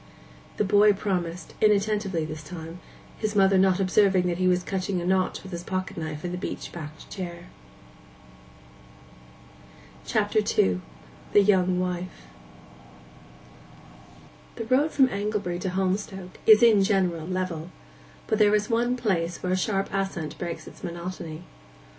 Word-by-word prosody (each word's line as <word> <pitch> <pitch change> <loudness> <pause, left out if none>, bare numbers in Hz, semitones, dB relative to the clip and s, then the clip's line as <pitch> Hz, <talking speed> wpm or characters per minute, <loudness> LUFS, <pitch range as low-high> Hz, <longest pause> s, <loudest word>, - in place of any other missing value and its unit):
The - - +2
boy 205 +1 +5
again 200 - +3
promised, 180 -4 -3
inattentively 205 -5 +2
this 155 0 -6
time, 165 +2 -8 0.4
his 215 -1 -2
mother 195 -1 +5
not 190 0 +3
observing 190 -1 +3
that 175 0 -2
he 185 - +2
was 180 0 +2
cutting 190 -1 -2
a 175 - -4
notch 185 0 0
with 190 - -10
his 170 -1 -4
pocket 185 +1 -3
knife 155 -2 -5
in 175 - -3
the 180 - -4
beech - - -5
backed 155 -2 -9
chair. 175 -2 -7 2.5
CHAPTER 215 0 +1
II—THE 90 - 0
YOUNG 185 -2 +3
WIFE 180 - -4 2.3
The 230 - -5
road 260 +6 +3
from 270 -4 +4
Anglebury 200 -4 -2
to 185 - -2
Holmstoke 190 0 -3
is 220 +1 +8
in 215 -4 +6
general 180 -5 +1
level; 185 -3 -3 0.6
but 220 - 0
there 210 0 +5
is 210 +2 -1
one 240 +2 +1
place 175 -8 -1
where 185 0 0
a - - +3
sharp 195 +1 0
ascent 190 -6 -2
breaks 170 -2 -5
its - - -13
monotony. 170 -1 -6
185 Hz, 140 wpm, -26 LUFS, 175-205 Hz, 2.5 s, is